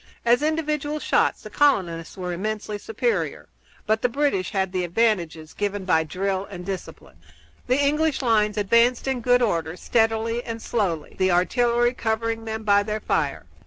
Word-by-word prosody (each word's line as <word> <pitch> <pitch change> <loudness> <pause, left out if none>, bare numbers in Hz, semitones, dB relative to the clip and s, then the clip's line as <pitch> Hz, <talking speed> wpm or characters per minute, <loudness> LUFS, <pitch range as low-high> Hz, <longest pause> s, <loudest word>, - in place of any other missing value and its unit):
As 240 +3 +4
individual 305 -1 -1
shots - - +1
the - - -9
colonists 180 - +1
were 180 -1 -3
immensely 210 +2 -4
superior, 450 - -2 0.4
but 220 +1 +1
the 245 - +2
British 245 -8 0
had 190 -2 -1
the 185 -1 -1
advantages 170 -5 0
given 205 -1 -3
by 160 -4 +3
drill 190 +4 -2
and 180 -3 -8
discipline. 190 -1 -7 0.5
The 255 +2 +2
English 295 0 +1
lines 215 -3 +2
advanced 235 +5 +3
in 265 -2 -1
good 245 +1 +3
order, 165 -6 -1
steadily 225 +1 0
and 230 0 -5
slowly, 190 -10 -2
the 185 0 +3
artillery 240 +7 +2
covering 225 -1 -2
them 220 0 -4
by 205 -1 +4
their 210 +1 -3
fire. 145 - -1
220 Hz, 160 wpm, -24 LUFS, 185-245 Hz, 0.5 s, As